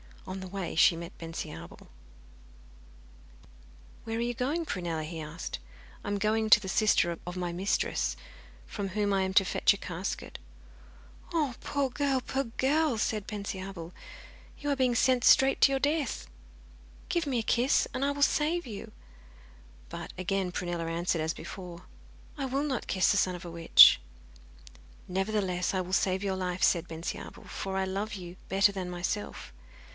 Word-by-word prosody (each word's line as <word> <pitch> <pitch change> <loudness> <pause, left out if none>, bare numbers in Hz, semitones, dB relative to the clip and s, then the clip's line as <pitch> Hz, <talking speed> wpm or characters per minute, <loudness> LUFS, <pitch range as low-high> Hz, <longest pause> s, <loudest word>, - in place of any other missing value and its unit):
On 190 +1 -5
the 190 - -7
way 190 -2 -4
she 170 - +6
met 170 0 -8
Bensiabel. 165 - -7 2.2
'Where 225 0 -3
are - - -1
you 240 +1 -1
going, 285 +8 -1
Prunella?' 170 - -3
he 160 +1 -6
asked. 155 - -6 0.4
'I - - -8
am 205 0 0
going 215 +2 +1
to 215 - +9
the 190 -2 -6
sister 190 -5 +3
of 175 - -4
my 175 -1 -2
mistress, 185 +4 0 0.5
from 200 -2 -4
whom 205 +1 0
I 195 -1 +2
am 190 0 -2
to 195 - +6
fetch 195 - +3
a - - -6
casket.' 185 0 -5 0.9
'Oh 300 -6 +1
poor, 280 -2 -1
poor 270 -1 0
girl!' 270 +3 +1
said 215 -2 -1
Bensiabel. 190 -4 -6 0.6
'You 290 - -4
are - - +2
being 255 -2 +2
sent 250 +1 +3
straight 270 +1 +6
to 275 - +7
your 270 - +1
death. 295 +1 -1 0.8
Give 340 -3 0
me 260 -3 0
a - - -2
kiss, 245 +4 +2
and 260 0 -2
I 285 - +2
will 285 0 0
save 315 +4 +2
you.' 215 -5 -8 1.0
But - - -7
again 185 0 -1
Prunella 175 -1 -3
answered 165 0 -1
as 160 +1 -1
before, 180 -2 -9 0.5
'I 275 - -2
will 270 +2 -1
not 270 -5 -2
kiss 185 - +3
the 205 - +2
son 185 -2 +2
of 175 - -9
a 170 - -7
witch.' 165 0 +8 1.1
'Nevertheless, 190 -1 -1
I 185 - +1
will 185 +1 -6
save 190 0 +2
your 195 -1 0
life,' 180 0 -2
said 175 -1 +3
Bensiabel, 165 +1 -6
'for 195 -1 -5
I 190 - +1
love 200 +3 -3
you 180 -2 -8
better 195 +1 +4
than 190 -2 -4
myself. 180 +4 -4
195 Hz, 165 wpm, -29 LUFS, 180-250 Hz, 2.2 s, to